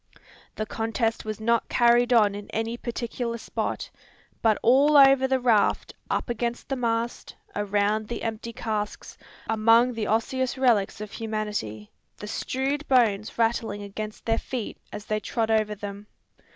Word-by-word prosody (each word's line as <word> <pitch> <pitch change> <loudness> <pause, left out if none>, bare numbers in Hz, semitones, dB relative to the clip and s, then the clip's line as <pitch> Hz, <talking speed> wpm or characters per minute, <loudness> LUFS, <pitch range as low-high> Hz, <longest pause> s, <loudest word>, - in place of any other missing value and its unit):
The 215 - -3
contest 225 +1 -2
was 215 0 -4
not 235 +1 +1
carried 240 0 +4
on 215 -4 +5
in 205 0 -8
any 225 +1 -2
particular 235 0 -4
spot, - - -4 0.5
but 220 -2 +3
all 280 +5 +5
over 270 -1 +7
the 265 0 +1
raft; 230 -5 +2 0.2
up - - -1
against 240 0 -3
the 270 - 0
mast, 235 -1 -2 0.2
around 205 +1 0
the 235 - -5
empty 225 +1 -4
casks, 215 -2 -4 0.3
among 225 +3 +4
the 220 -3 -3
osseous 260 +4 0
relics 225 -5 +2
of 210 -1 -7
humanity, 210 - -4 0.3
the - - -8
strewed 270 +7 -2
bones 220 -5 +2
rattling 225 -3 0
against 210 +1 -7
their 225 0 +1
feet 245 -5 -5
as 210 - -7
they 215 0 -1
trod 225 +1 -1
over 215 -1 +1
them. 205 0 -8
225 Hz, 150 wpm, -26 LUFS, 210-240 Hz, 0.5 s, over